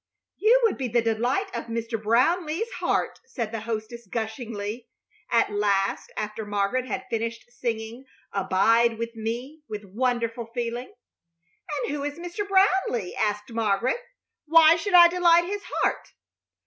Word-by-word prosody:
"You 470 +4 +5
would 450 -9 +2
be 260 - -1
the 235 0 +1
delight 245 - 0
of - - -4
Mr. 230 -1 -3
Brownleigh's 320 - +1
heart," - - 0
said 230 -4 -4
the 225 - -3
hostess, 220 +1 -5
gushingly, 220 0 -5 0.4
at 230 -2 +3
last, 200 -1 0
after 215 +1 -3
Margaret 205 +5 -1
had 255 0 -4
finished 230 0 -3
singing 235 +1 -4 0.3
"Abide 225 +4 +3
With 230 0 -4
Me" 240 +7 -5
with 210 -1 -6
wonderful 235 +2 -1
feeling. 240 +1 -3 0.9
"And - - -2
who 290 -1 -3
is 290 +1 -4
Mr. 350 +4 -5
Brownleigh?" 380 - +2
asked 210 0 -1
Margaret. 225 - +1 0.5
"Why 325 +1 +7
should 370 +2 0
I 345 -1 +10
delight 345 -1 +4
his 405 +3 -3 0.2
heart?" - - -1
235 Hz, 140 wpm, -25 LUFS, 220-310 Hz, 0.9 s, I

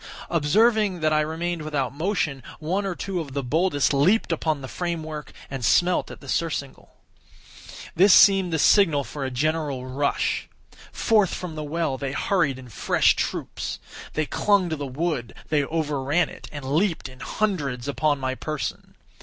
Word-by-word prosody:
Observing 200 +4 +3
that 155 0 +2
I 155 - +4
remained 165 +2 -2
without 145 -5 -2
motion, 155 -4 -1 0.2
one 185 +6 -1
or 185 - -3
two 190 0 -3
of 145 -5 -6
the 140 - -1
boldest 150 +2 +1
leaped 180 +10 +3
upon 155 -3 0
the 130 - -6
frame 170 +1 -3
work, 155 -1 -7 0.2
and 135 -2 -6
smelt 180 +9 +3
at - - -10
the - - -12
surcingle. 145 -5 -3 1.0
This 190 +4 +6
seemed 195 -2 +6
the 160 - +1
signal 160 -3 +4
for 145 +1 -6
a 135 - -1
general 145 0 -1
rush. 140 +3 -1 0.4
Forth 210 -5 +2
from 180 -3 -6
the 155 - -5
well 150 -3 -2
they 135 -1 -3
hurried 150 -7 +1
in 130 -1 -11
fresh 105 - +2
troops. - - -3 0.4
They 155 - 0
clung 195 +1 +2
to - - 0
the 145 -2 -5
wood—they 145 - -2
overran 150 +1 0
it, - - -11
and 145 -2 -7
leaped 160 +5 0
in 130 0 -14
hundreds 145 - -2
upon 145 +1 +1
my 130 -1 -1
person. 155 +2 -5
155 Hz, 165 wpm, -24 LUFS, 140-175 Hz, 1.0 s, This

